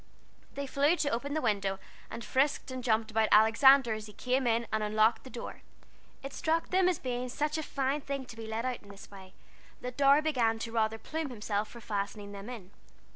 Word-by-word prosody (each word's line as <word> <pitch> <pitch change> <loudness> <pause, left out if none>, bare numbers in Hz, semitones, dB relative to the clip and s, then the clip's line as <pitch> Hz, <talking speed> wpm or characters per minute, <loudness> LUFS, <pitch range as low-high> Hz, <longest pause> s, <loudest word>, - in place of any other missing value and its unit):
They 280 - -3
flew 285 +4 +2
to 300 -4 0
open 280 +6 -2
the 310 - -1
window, 200 -2 0 0.3
and 230 - -7
frisked 275 0 0
and 255 -1 -5
jumped 220 -2 +1
about 220 0 +2
Alexander 230 +3 +6
as 215 0 -6
he 210 - -12
climbed 255 +2 0
in 230 0 +2
and 215 - +1
unlocked 215 +2 +2
the 260 - -10
door. 245 - -8 0.6
It 275 0 -6
struck 325 0 0
them 370 0 +3
as 360 - 0
being 250 0 -3
such 300 +4 -1
a - - -1
fine 280 -1 -1
thing 275 -1 -4
to 245 - -11
be 225 -1 -8
let 220 +2 -3
out 255 -2 -2
in 200 - -17
this 200 0 -13
way, 190 -1 -13 0.5
that 250 0 -6
Dorry 280 +1 +6
began 240 -8 +1
to 225 0 -5
rather 225 -1 0
plume 315 +5 -4
himself 210 -3 -2
for 235 - -11
fastening 205 -1 -4
them 200 +3 -8
in. 210 -7 -9
240 Hz, 215 wpm, -30 LUFS, 220-275 Hz, 0.6 s, Alexander